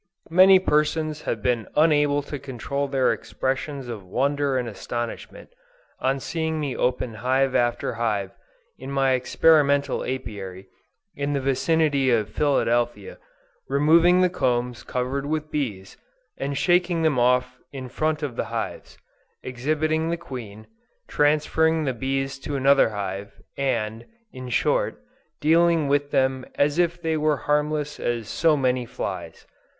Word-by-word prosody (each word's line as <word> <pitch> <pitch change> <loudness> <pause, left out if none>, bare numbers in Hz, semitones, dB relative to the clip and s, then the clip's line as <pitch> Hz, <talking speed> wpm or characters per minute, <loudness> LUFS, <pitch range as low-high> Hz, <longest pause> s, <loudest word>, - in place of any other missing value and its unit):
Many 190 +2 +8
persons 155 -2 0
have 110 - -3
been 120 -3 0
unable 145 -2 +3
to 145 0 -6
control 140 +1 -4
their 135 -2 +2
expressions 135 0 -4
of 115 -5 -6
wonder 140 +7 0
and 125 -2 -2
astonishment, 120 +2 -6 0.5
on 135 +1 0
seeing 160 +2 -2
me 145 -4 -2
open 125 -1 -1
hive 130 +1 +2
after 120 0 0
hive, 105 -4 -1 0.5
in - - -8
my 135 -1 +2
experimental 140 +2 +3
Apiary, 100 -7 -6 0.5
in 140 +1 -2
the 140 - 0
vicinity 140 +1 +1
of 110 -3 +1
Philadelphia, 120 - 0 0.5
removing 165 +5 +5
the 180 - +4
combs 125 -5 -1
covered 130 +3 -3
with 155 0 -3
bees, 105 -10 -4 0.4
and 140 0 -3
shaking 175 -1 +2
them 150 -5 +2
off 125 +1 +2
in 130 -2 -7
front 155 +4 -1
of 135 -5 -3
the - - -2
hives; - - -5 0.5
exhibiting 155 +5 -1
the 170 - -1
queen, 120 -10 -9 0.4
transferring 155 +2 +2
the 135 -3 -1
bees 135 +2 -2
to 140 +1 -5
another 140 -2 +4
hive, 100 -1 -5 0.2
and, 115 -5 -2 0.3
in 130 -1 -8
short, 120 - 0 0.4
dealing 165 0 +3
with 145 0 +1
them 130 -2 +1
as 145 +3 +1
if 175 0 +1
they 160 -2 -1
were 155 -2 +1
as - - -14
harmless 150 0 0
as 120 -3 -2
so 160 +6 +2
many 130 -2 +1
flies. 120 - -6
140 Hz, 140 wpm, -24 LUFS, 125-155 Hz, 0.5 s, Many